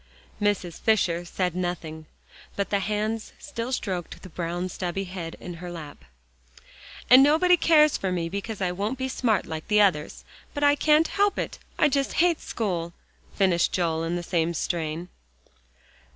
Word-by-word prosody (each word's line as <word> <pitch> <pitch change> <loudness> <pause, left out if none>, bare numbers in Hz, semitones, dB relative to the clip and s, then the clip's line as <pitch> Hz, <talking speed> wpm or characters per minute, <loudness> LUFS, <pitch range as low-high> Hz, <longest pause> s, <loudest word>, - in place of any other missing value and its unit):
Mrs. 200 -5 0
Fisher 175 -6 +2
said 180 0 -2
nothing, 165 -3 -4 0.5
but 200 - -2
the 200 - +2
hands 215 +2 -2
still 250 -4 -5
stroked 185 -8 -3
the 185 - -9
brown 175 +2 -3
stubby 185 +1 -3
head 180 -3 -6
in 175 - -7
her 180 -1 -6
lap. 155 -4 -9 1.0
"And 255 +2 +9
nobody 320 +6 +5
cares 310 -3 +4
for 190 - -2
me 170 -2 -1
because 200 +4 -5
I 180 -1 +1
won't 205 +8 -2
be 260 +1 -2
smart 235 -5 0
like 160 -1 -6
the 210 0 +3
others, 175 -7 +1 0.3
but 290 - -2
I 285 0 +6
can't 305 +2 +3
help 405 0 +1
it, - - -4 0.2
I 305 - +5
just 275 -1 0
hate 345 -1 +2
school!" 175 -6 -3 0.4
finished 185 -4 +2
Joel 165 -3 0
in 165 +1 -1
the 175 - -3
same 170 -1 0
strain. 165 +1 -3
190 Hz, 165 wpm, -26 LUFS, 170-245 Hz, 1.0 s, And